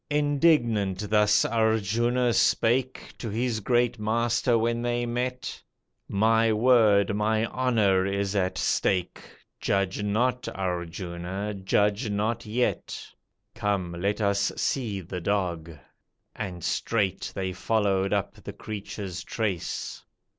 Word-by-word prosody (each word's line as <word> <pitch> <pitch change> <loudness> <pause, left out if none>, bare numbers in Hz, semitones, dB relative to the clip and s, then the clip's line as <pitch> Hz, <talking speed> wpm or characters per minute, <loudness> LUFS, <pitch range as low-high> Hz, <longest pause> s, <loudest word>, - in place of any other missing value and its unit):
Indignant 135 - +2
thus 105 0 +4
Arjuna 115 +2 +1
spake 125 +4 +1
To 115 - -4
his 115 +1 -1
great 120 +1 +1
Master 115 +2 +1
when 115 +1 0
they 120 0 -1
met 125 +1 -3 0.5
"My 110 +2 +3
word, 110 -3 +4
my 110 +1 +1
honour, 110 -7 +2
is 100 0 -1
at 95 -2 0
stake, 90 -2 0 0.4
Judge 100 0 0
not, 125 +5 0
Arjuna, 90 +2 -4
judge 105 +3 +1
not 110 +3 -1
yet. 120 +3 -1 0.5
Come, 100 -5 -1
let 100 +5 -2
us 100 -1 +1
see 110 -8 -1
the 90 +1 -6
dog," 85 -4 -1 0.7
and 90 -5 -5
straight 100 -5 -1
They 95 -1 -2
followed 100 -1 +1
up 100 -2 -2
the - - -7
creature's 100 -3 -6
trace. 100 -7 -3
105 Hz, 110 wpm, -26 LUFS, 95-120 Hz, 0.7 s, thus